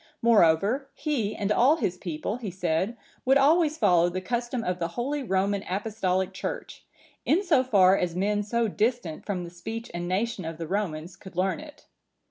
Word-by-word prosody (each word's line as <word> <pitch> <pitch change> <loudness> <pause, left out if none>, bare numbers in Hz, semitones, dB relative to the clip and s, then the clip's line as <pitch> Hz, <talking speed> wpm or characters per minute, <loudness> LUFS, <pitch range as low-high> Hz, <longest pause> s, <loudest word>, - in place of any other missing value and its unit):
Moreover, 220 - +4
he 255 -9 -1
and 205 -1 -1
all 255 +8 +5
his 185 - -1
people, 175 +4 -4
he 230 -5 -5
said, 180 +5 -1 0.3
would 265 +1 +5
always 310 +2 +4
follow 175 - +4
the 185 +1 -3
custom 240 +4 -2
of 180 0 -2
the 170 - 0
holy 255 +11 -3
Roman 195 -3 0
Apostolic 190 -2 -1
Church, 185 - -6 0.4
in 355 +6 +2
so 305 -9 +3
far 195 -6 +5
as 175 -3 -1
men 205 +3 +1
so 230 +2 0
distant 210 -6 -1
from 190 -4 -2
the 170 - -8
speech 225 +7 -7
and 175 0 -4
nation 200 +2 -1
of 165 0 -5
the 165 - -4
Romans 175 -2 -3
could 190 -1 -13
learn 185 +5 0
it. 300 -1 -13
200 Hz, 180 wpm, -27 LUFS, 180-240 Hz, 0.4 s, all